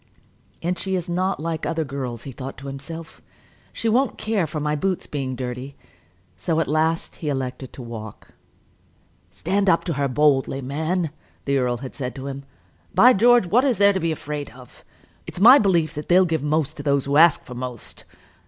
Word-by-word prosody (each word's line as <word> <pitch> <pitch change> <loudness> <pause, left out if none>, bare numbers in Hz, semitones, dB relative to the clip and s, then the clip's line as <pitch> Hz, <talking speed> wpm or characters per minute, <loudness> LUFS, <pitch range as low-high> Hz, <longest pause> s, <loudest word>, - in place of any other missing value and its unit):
"And 180 +2 -1
she 190 -1 -1
is 180 -1 -3
not 185 +2 -1
like 160 0 -3
other 165 0 -1
girls," 130 -4 -5
he 135 - -7
thought 130 +2 -8
to 135 - -11
himself. 140 +4 -8 0.5
"She 230 - -3
won't 245 +4 +2
care 210 -6 0
for 155 +1 -4
my 150 0 -1
boots 185 +4 -1
being 135 -3 -4
dirty." 125 +2 -6 0.6
So 160 - -1
at 165 - 0
last 160 +2 0
he 155 - -4
elected 130 -1 -4
to 130 - -9
walk. 110 -3 -9 1.0
"Stand 200 0 0
up 165 - +3
to 170 - -2
her 140 -1 0
boldly, 135 0 +2
man," 155 +5 -2 0.3
the 140 -1 +1
earl 125 -1 0
had 130 - -8
said 125 -3 -5
to 135 - -7
him. 140 0 -6 0.5
"By 250 +2 +7
George, 240 +1 +5
what 230 +9 +3
is 260 -6 +2
there 200 +1 +5
to 190 - -1
be 165 -2 0
afraid 150 -2 -5
of? 125 -1 -16 0.4
It's - - -7
my 245 +8 +9
belief 170 -6 +2
they'll 175 +5 +3
give 160 -4 -1
most 150 0 -1
to - - -5
those 140 -2 +1
who 140 +1 +1
ask 165 0 +6
for 125 - -10
most. 125 -2 -7
150 Hz, 190 wpm, -23 LUFS, 135-180 Hz, 1.0 s, my